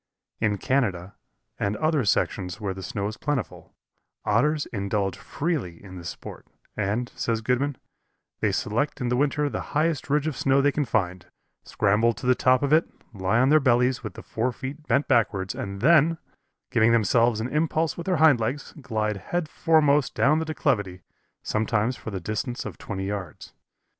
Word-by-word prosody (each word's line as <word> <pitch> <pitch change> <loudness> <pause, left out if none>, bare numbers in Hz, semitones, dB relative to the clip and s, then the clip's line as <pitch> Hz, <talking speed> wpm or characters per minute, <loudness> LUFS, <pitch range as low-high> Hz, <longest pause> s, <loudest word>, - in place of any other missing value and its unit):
In 105 -2 +1
Canada, 100 -8 -1 0.5
and 100 +1 -1
other 155 -3 +1
sections 95 -1 0
where 100 -3 -2
the 95 - -8
snow 100 +2 -3
is 110 - -6
plentiful, 145 -3 -4 0.5
Otters 145 +8 +2
indulge 100 -2 -1
freely 145 - -3
in 95 -2 -10
this 85 -1 -6
sport, - - -10 0.3
and, 110 +4 -1
says 115 -1 -1
Godman, 130 +3 0 0.6
"they - - +1
select 130 +8 -1
in 125 -2 0
winter 145 +2 +1
the - - -3 0.2
highest 155 -3 0
ridge 150 +1 +2
of 155 -3 -2
snow 135 +1 +2
they 145 +1 +3
can 145 +1 -1
find, 95 -6 -1 0.4
scramble 110 +4 +2
to - - -9
the 125 - +5
top 130 +1 +3
of 140 +1 +2
it, 160 - +4 0.2
lie 95 +2 0
on 130 +3 +4
their 155 +1 +6
bellies 125 -1 +2
with 110 -4 -6
the - - -9
forefeet 130 +6 -4
bent 140 +1 +2
backwards 105 -7 +1
and 100 0 -6
then, 165 +3 +5 0.5
giving 115 0 +4
themselves 115 +1 +3
an 115 +3 -2
impulse 155 +2 0
with 170 - -7
their 185 -3 +2
hindlegs, 140 -3 +2
glide 110 -4 -1
head 175 - -3
foremost 150 -3 +2
down 155 +2 +3
the 160 - -2
declivity, 100 - -1 0.4
sometimes 110 +2 0
for - - -8
the 100 -3 -4
distance 110 +7 -4
of - - -7
twenty 95 -2 -5
yards. 95 -5 -6
120 Hz, 170 wpm, -25 LUFS, 105-145 Hz, 0.6 s, their